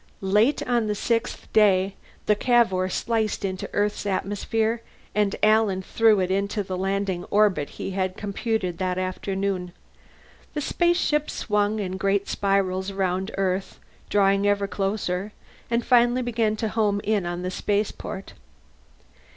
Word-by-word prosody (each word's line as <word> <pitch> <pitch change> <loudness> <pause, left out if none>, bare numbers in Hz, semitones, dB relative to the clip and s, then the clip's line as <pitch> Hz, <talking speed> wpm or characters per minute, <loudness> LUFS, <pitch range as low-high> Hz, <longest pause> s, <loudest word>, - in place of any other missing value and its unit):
Late 225 +8 +3
on 235 -3 +1
the 210 - 0
sixth 230 +2 -1
day 195 -3 +4 0.3
the 210 - +4
Cavour 210 -6 +2
sliced 220 0 -1
into 185 -1 -4
Earth's 205 0 -1
atmosphere, 220 +4 -1 0.3
and 210 -1 +1
Alan 215 -3 +3
threw 220 +1 +3
it 185 0 0
into 200 +2 0
the 185 -1 -4
landing 190 -1 -1
orbit 200 -8 +2
he - - -4
had 185 0 -2
computed 200 -3 -2
that 185 -1 -1
afternoon. 185 0 -2 0.8
The 345 +4 +2
ship 300 -4 +1
swung 210 0 0
in 190 -3 -3
great 195 +1 +1
spirals 195 -1 0
around 190 0 -1
Earth, 190 0 -1 0.3
drawing 200 0 +3
ever 200 0 +2
closer, 195 0 -2 0.4
and 235 0 0
finally 245 +1 +4
began 225 -3 0
to 220 0 -2
home 210 -2 +1
in 205 -4 0
on 175 +1 -4
the 185 - -2
spaceport. 200 -1 -3
200 Hz, 135 wpm, -25 LUFS, 190-220 Hz, 0.8 s, day